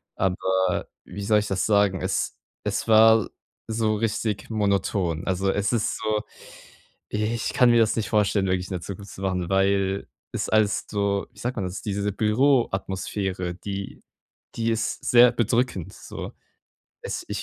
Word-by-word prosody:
Aber 95 -1 0 0.2
wie 100 +3 -7
soll 105 +1 +4
ich 105 - -3
das 95 -2 0
sagen, 100 -4 +3
es - - -1 0.3
es - - -2
war 110 -1 +6 0.4
so 110 -1 +1
richtig 105 -2 -2
monoton. 100 -5 0
Also, 95 +1 +1
es 100 +3 0
ist 115 -3 0
so 110 -1 0 0.9
ich 110 +2 -1
kann 125 - +5
mir 120 - +5
das 110 -2 +3
nicht 110 - -1
vorstellen, 105 -2 +2
wirklich 90 0 0
in - - -6
der 90 - -4
Zukunft 100 +2 -8
zu - - -10
machen, 90 -2 -1
weil 95 0 +1 0.3
es - - -2
alles 110 -2 +2
so, 100 -1 0
wie - - -17
sagt 125 +2 -3
man 100 - -1
das, 90 +1 -5
diese 100 0 -2
Büroatmosphäre, 100 -6 0
die 100 +1 -6 0.5
die 115 0 0
ist 115 0 -2
sehr 120 0 +7
bedrückend, 115 -6 0
so. - - -8 0.7
Es - - -4
ich - - -3
100 Hz, 160 wpm, -25 LUFS, 95-110 Hz, 0.9 s, sehr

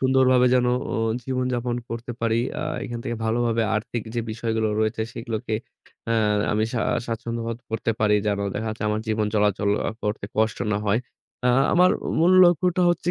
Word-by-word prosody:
সুন্দরভাবে 130 -1 +4
যেন 125 -1 +3 0.3
আ - - 0 0.3
জীবনযাপন 125 -2 -1
করতে 115 +1 -5
পারি। 115 0 +1 0.2
আ - - -2 0.2
এখান 120 -1 -5
থেকে 120 - -3
ভালোভাবে 115 0 +1
আর্থিক 115 +1 -3
যে 120 - 0
বিষয়গুলো 110 0 -1
রয়েছে 110 0 0
সেগুলোকে 115 -1 -4 1.0
আমি 110 +1 +1
আ - - -10
সা 120 - 0 0.3
স্বাচ্ছন্দ্যবোধ 115 0 -3
করতে 115 0 -1
পারি 105 -1 +4
যেন 100 -1 +1 0.2
দেখা 110 +1 -2
যাচ্ছে 110 0 -5
আমার 105 +1 0
জীবন 110 -1 +1
চলাচল 105 -1 +2 0.3
করতে 105 -1 -2
কষ্ট 110 0 +1
না 105 - +1
হয়। 110 +4 +2 0.5
আ - - +4 0.2
আমার 180 +1 +5 0.3
মূল 175 +3 +5
লক্ষ্যটা 175 +1 +3
হচ্ছে 175 0 -1
115 Hz, 165 wpm, -24 LUFS, 110-125 Hz, 1.0 s, আমার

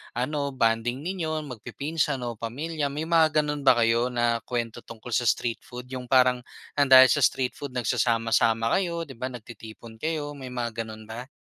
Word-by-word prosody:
ano 140 +2 -2
bonding 115 +3 0
ninyo 160 -4 -2
magpipinsan 140 +4 -2
o 120 -2 -4
pamilya. 145 +6 -3
May 145 +3 -4
mga 160 -2 +4
gano'n 150 -1 -3
ba 130 - +7
kayo 115 +1 +3
na 120 -1 +1
kuwento 120 -1 -3
tungkol 115 +1 -10
sa 120 0 +1
street 115 +1 0
food 125 0 -9
yung 125 -1 -6
parang 125 -1 +4 0.4
ng 140 - +4
dahil 130 0 +9
sa 145 - +3
street 130 -1 0
food 140 -3 -7
nagsasama-sama 115 -1 +1
kayo 170 -3 -2
'di 140 -4 -10
ba 130 - -2
nagtitipon 115 -1 -11
kayo, 155 -2 -2
may 130 -2 -8
mga 115 -2 -3
gano'n 110 0 -10
ba? 120 +4 -8
125 Hz, 180 wpm, -26 LUFS, 115-145 Hz, 0.4 s, dahil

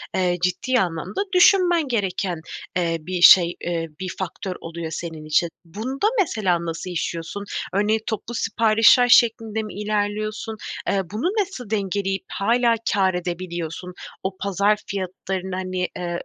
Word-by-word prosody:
eee, 180 -1 +1
ciddi 250 +8 +1
anlamda 180 - -2
düşünmen 355 -4 +5
gereken, 190 -7 -1 0.4
eee, 170 -2 0
bir 180 +2 -4
şey, 175 0 +8
eee, 170 -1 -2
bir 185 -1 -4
faktör 190 0 -4
oluyor 165 -1 -6
senin 160 -2 -6
için. 155 +2 +2 0.2
Bunda 235 - -2
mesela 190 - +1
nasıl 165 +2 -4
işliyorsun? 170 +3 -4 0.3
Örneğin, 210 +3 +2
toplu 220 +1 -4
siparişler 225 +2 +4
şeklinde 225 -3 +4
mi 215 - -8
ilerliyorsun? 215 +1 -2 0.3
Eee, 195 - +2
bunu 215 +9 -3 0.2
nasıl 310 - -6
dengeleyip 195 -2 -1
hâlâ 235 +3 +2 0.2
kâr 190 -2 +2
edebiliyorsun? 175 0 -4 0.3
O 190 0 -3
pazar 200 +2 +1
fiyatlarını, 190 -1 -4
hani, 185 -1 -2
eee, 175 -1 -3
195 Hz, 135 wpm, -23 LUFS, 175-220 Hz, 0.4 s, şey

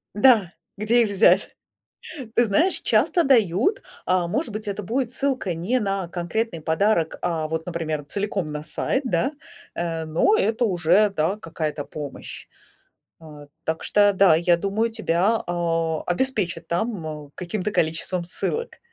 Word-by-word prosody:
Да. 210 -6 +4 0.2
Где 230 +4 +3
их 220 - -1
взять? 200 +1 +3 0.8
Ты 240 - +4
знаешь, 310 - +2
часто 345 - +2
дают, 235 - +3 0.2
а, 185 -1 +1
может 280 - -2
быть, 215 0 -5
это 200 +1 -3
будет 235 +5 -1
ссылка 260 -8 -1
не 195 +10 0
на 195 -4 -2
конкретный 175 +2 -3
подарок, 165 +1 +1
а 165 -3 -1
вот, 160 0 -3
например, 160 -4 -3
целиком 195 -1 -3
на 150 0 -5
сайт, 165 - -1
да? 245 - 0 0.4
Э, 165 -1 -3
но 165 - +2
это 230 - +1
уже, 180 +2 +3
да, 185 +1 0
какая-то 155 -5 -4
помощь. 145 -1 -8 0.7
Э, 150 -2 -12 0.2
так 160 0 -2
что 205 -1 +4
да, 195 -3 +5
я 170 +1 +3
думаю, 205 +5 0
тебя, 220 0 +1
а, 165 -2 -1
обеспечат 180 -5 -1
там, 180 0 -2 0.2
э, - - -27
каким-то 185 +3 -3
количеством 170 0 -1
ссылок. 455 - -3
185 Hz, 145 wpm, -23 LUFS, 165-220 Hz, 0.8 s, да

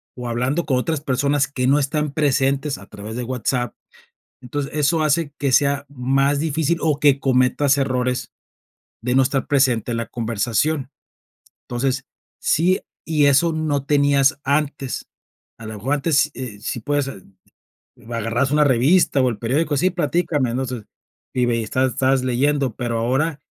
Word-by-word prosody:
o 125 -1 -6
hablando 125 +8 -1
con 130 - +1
otras 150 +3 -1
personas 140 0 +1
que 130 -3 -2
no 140 +2 +4
están 150 +1 -1
presentes, 140 -1 +1
a - - -13
través 105 +2 -8
de 125 - -3
WhatsApp. 125 -1 -2 0.7
Entonces, 140 +2 -4
eso 155 +2 +2
hace 155 0 +1
que 140 -2 0
sea 140 +2 +2
más 135 +1 +1
difícil 160 +1 0
o 150 -3 +1
que 145 -2 +4
cometas 135 +2 +2
errores 125 -2 -1 0.7
de 125 +2 -1
no 135 - +6
estar 130 +1 0
presente 130 -5 +2
en 115 - -1
la 115 - -3
conversación. 120 +6 -1 0.8
Entonces, 130 +2 -2 0.3
sí, 180 +4 +2 0.3
y 155 -2 +2
eso 145 +4 +4
no 150 -3 -1
tenías 140 -1 +3
antes, 140 -2 -1 0.5
a 115 - -9
la 110 - -6
mejor 130 +8 -1
antes, 150 +1 +2
s - - -23 0.3
eh, - - -19
si 120 - -3
puedes, 145 +3 -1
eh, 95 - -9 0.9
agarrabas 115 +3 -1
una 150 0 +4
revista, 140 +3 +3
o 130 - +3
el 115 -4 -3
periódico: 145 +7 0
"Sí, 185 +7 +2
platícame", 150 -6 0
no 130 +1 -1
sé, 120 -4 -6 0.5
y 125 -1 +2
ve 120 - +1
y - - -1
estás 130 +4 0
estabas 130 0 +1
leyendo, 135 0 +1
pero 120 -2 -2
ahora, 135 +6 0
135 Hz, 165 wpm, -21 LUFS, 125-145 Hz, 0.9 s, no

